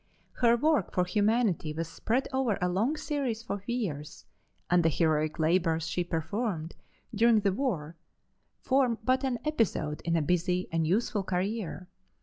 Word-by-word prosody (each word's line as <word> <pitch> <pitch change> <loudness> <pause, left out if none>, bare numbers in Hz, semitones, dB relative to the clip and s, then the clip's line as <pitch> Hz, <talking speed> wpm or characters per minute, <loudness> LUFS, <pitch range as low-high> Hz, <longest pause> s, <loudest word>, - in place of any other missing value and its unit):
Her 235 -1 +4
work 300 - +2
for 180 - +1
humanity 205 -4 +1
was 165 +1 -3
spread 235 +10 -1
over 260 -5 +1
a 180 - +1
long 220 - 0
series 270 -8 -2
of 200 -1 -5
years, 165 - -4 0.4
and 180 0 +4
the 165 - +3
heroic 155 0 +1
labors 165 0 +2
she 170 +2 -1
performed 170 0 -3 0.4
during 225 0 +4
the 200 -2 +1
war 180 - -2 0.7
form 260 -3 +2
but 260 +3 +2
an 260 -2 0
episode 220 - 0
in 170 0 0
a 160 - +2
busy 180 +2 0
and 165 -1 0
useful 205 +3 +1
career. 185 0 -3
190 Hz, 150 wpm, -29 LUFS, 165-235 Hz, 0.7 s, Her